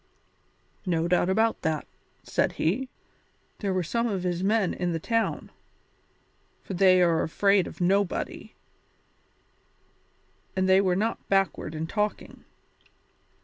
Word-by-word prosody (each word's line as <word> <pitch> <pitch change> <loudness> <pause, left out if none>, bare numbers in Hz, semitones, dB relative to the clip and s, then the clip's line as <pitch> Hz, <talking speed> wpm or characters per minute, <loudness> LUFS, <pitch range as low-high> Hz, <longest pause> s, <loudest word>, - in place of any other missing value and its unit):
"No 165 -1 +1
doubt 180 +1 +2
about 220 +4 +1
that," 155 -2 -1 0.4
said - - 0
he; 235 +11 -1 0.7
"there 200 -2 -1
were 185 -1 0
some 235 +8 -1
of 195 -5 -2
his 180 0 -2
men 210 -2 +2
in 175 -1 -2
the 165 - -2
town 230 +6 -1 1.1
for - - -6
they 185 -1 +5
are 165 -2 +3
afraid 195 +3 +2
of - - -11
nobody 190 +1 -1 2.0
and 190 0 +1
they 190 +1 +5
were 185 -2 +1
not 220 +4 -2
backward 195 -5 0
in 155 +1 -3
talking." 210 +4 -3
190 Hz, 125 wpm, -26 LUFS, 175-205 Hz, 2.0 s, they